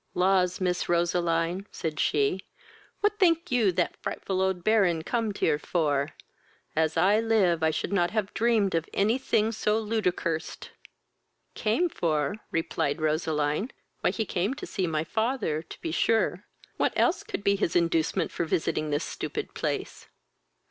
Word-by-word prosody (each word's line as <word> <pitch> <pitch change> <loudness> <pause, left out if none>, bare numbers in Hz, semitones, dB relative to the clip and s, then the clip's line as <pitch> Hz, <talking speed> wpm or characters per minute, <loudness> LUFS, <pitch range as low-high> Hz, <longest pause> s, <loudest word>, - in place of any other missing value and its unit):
"Laws, 180 -1 +2
Miss 180 -1 -1
Roseline, 170 +1 +1
(said 155 -3 -4
she,) 145 +5 +2 0.6
what 420 0 +1
think 340 -4 +3
you 230 -6 +3
that 175 0 0
frightful 190 -1 -2
old 190 -2 0
Baron 190 -7 +3
comed 225 0 -1
here 150 -2 +2
for? 145 -3 0 0.6
As 160 0 +1
I 195 +5 +4
live 210 -7 +2
I 160 - +3
should 160 +5 -2
not 175 -3 +2
have 210 0 -2
dreamed 220 -3 +2
of 165 -1 -1
any 220 +6 +2
thing 220 -4 +1
so 215 -1 +1
ludicurst!" 185 -7 -2 0.8
"Came 225 +12 +1
for? 155 - -1
(replied 165 -2 -1
Roseline,) 155 - 0 0.3
why - - +2
he 220 - -2
came 195 +7 -1
to 300 - -7
see 185 -3 -2
my 155 -1 0
father 220 - -1
to - - -12
be 160 - -3
sure; 200 +1 +1 0.3
what - - +1
else 360 +1 +2
could 405 - -6
be 200 0 +3
his 180 -4 -1
inducement 165 -2 +1
for - - -2
visiting 155 -1 -1
this 145 0 0
stupid - - -5
place?" - - -4
180 Hz, 155 wpm, -27 LUFS, 160-215 Hz, 0.8 s, I